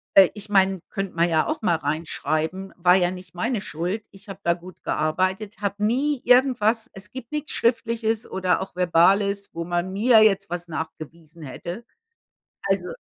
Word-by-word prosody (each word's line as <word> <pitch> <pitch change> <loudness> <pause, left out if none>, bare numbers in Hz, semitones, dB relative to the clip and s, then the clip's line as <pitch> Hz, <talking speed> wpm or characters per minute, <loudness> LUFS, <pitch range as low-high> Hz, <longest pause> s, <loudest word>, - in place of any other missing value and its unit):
Äh, 195 -2 +8
ich 210 0 -9
meine, 195 -1 +3
könnte 195 -1 -4
man 170 +1 +2
ja 160 -1 +2
auch 310 -4 -3
mal 175 -5 +2
reinschreiben, 160 +4 -2
war 180 0 +5
ja 180 -1 +2
nicht 180 -1 -10
meine 225 +3 -1
Schuld. 180 +6 -3
Ich 195 +2 -18
habe 195 - -8
da 170 - +2
gut 180 +1 -14
gearbeitet, 185 +6 -1
habe 205 +1 -2
nie 270 +5 +1
irgendwas 245 -3 +3
es 195 - -11
gibt 255 -2 -9
nix 300 0 -4
Schriftliches 230 -1 0
oder 185 -1 0
auch 190 -1 -7
Verbales, 195 +3 +3
wo 170 0 -4
man 175 +2 -2
mir 220 +2 +5
jetzt 195 -2 +2
was 175 0 -5
nachgewiesen 160 0 -8
hätte, 175 - -7 0.8
also 190 -2 0
190 Hz, 170 wpm, -24 LUFS, 175-215 Hz, 0.8 s, Äh